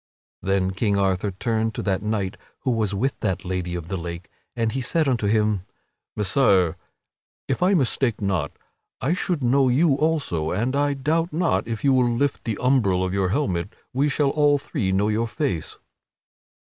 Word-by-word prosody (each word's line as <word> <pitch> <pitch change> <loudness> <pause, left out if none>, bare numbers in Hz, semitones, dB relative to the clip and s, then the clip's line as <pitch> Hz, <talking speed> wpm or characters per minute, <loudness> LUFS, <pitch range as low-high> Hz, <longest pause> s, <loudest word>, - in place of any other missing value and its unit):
Then 95 0 +1
King 100 +1 0
Arthur 95 0 +1
turned 110 +3 -1
to - - -3
that 95 -2 0
knight 105 -2 -2 0.3
who 130 - 0
was 110 -4 0
with 130 +7 -1
that 95 - -2
Lady 90 -1 -3
of 85 -2 -5
the 95 - -3
Lake, 85 +1 -7 0.2
and 115 -2 0
he 130 - -2
said 155 +5 +1
unto 120 -6 +1
him: 105 -2 +2 0.5
"Messire, 95 -5 +3 0.7
if 135 - -1
I 190 +2 +4
mistake 130 - +1
not, 100 -4 -1 0.5
I 140 +7 +1
should 180 -5 -1
know 130 +2 +3
you 145 +4 +4
also; 140 - 0
and 120 +10 -1
I 145 0 +1
doubt 160 +5 0
not, 165 -5 0
if 115 -2 -4
you 140 -1 +4
will 125 -2 +3
lift 125 +4 -1
the 110 -3 -2
umbril 110 -8 +2
of 90 - -3
your 95 -2 +1
helmet, 100 -5 -1 0.2
we 140 +3 +2
shall 140 -1 +1
all 145 -1 +3
three 100 -8 -2
know 100 +2 +2
your 110 +2 0
face." 125 - -3
115 Hz, 180 wpm, -23 LUFS, 95-140 Hz, 0.7 s, I